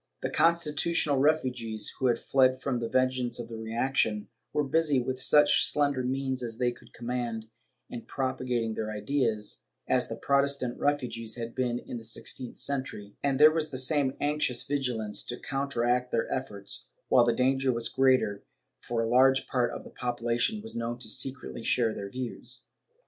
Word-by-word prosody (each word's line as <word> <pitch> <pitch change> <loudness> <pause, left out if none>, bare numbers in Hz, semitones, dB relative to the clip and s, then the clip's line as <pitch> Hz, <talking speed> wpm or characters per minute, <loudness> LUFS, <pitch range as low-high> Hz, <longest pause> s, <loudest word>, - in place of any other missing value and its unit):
The - - -1
Constitu 170 -1 +2
tionalist 145 -5 +3
refugees, 125 -8 0
who 130 - +2
had 120 -2 +3
fled 130 0 +3
from 130 -2 -1
the 115 -1 -3
vengeance 130 -1 +1
of 120 -1 -6
the 115 - -6
reaction, 110 -2 0 0.2
were 150 - +1
busy, 150 -1 +2
with 130 +1 -3
such 150 +3 +5
slender 140 -3 +3
means 130 0 -1
as 115 -2 -4
they 125 0 +1
could 120 - -16
command, 120 -2 -4 0.4
in 120 - -7
propagating 125 -4 -2
their 110 0 -3
ideas, 110 0 -1 0.2
as - - +2
the - - -5
Protestant 140 -3 +1
refugees 120 -6 -1
had 115 -1 -5
been 125 -2 0
in 120 - -7
the - - -12
sixteenth 115 +2 -5
century, 130 -7 -3
and 140 -1 0
there 155 +1 +9
was 155 -1 -1
the 130 - -5
same 135 0 +2
anxious 145 -4 0
vigilance 125 -7 -1
to 120 - -3
counteract 125 -3 0
their 115 - 0
efforts, 100 -7 -6 0.2
while 125 - +6
the 120 - +3
danger 130 +2 +2
was 115 -1 -1
greater, 130 -6 +2 0.4
for 115 -1 -1
a - - -1
large 130 +3 +4
part 125 -2 0
of - - -7
the - - -12
population 120 - -1
was 225 - -6
known 115 +1 -3
to 120 -3 -3
secretly 130 -1 -2
share 115 -1 +2
their 100 -1 -6
views. 125 +1 -4
125 Hz, 175 wpm, -29 LUFS, 115-135 Hz, 0.4 s, there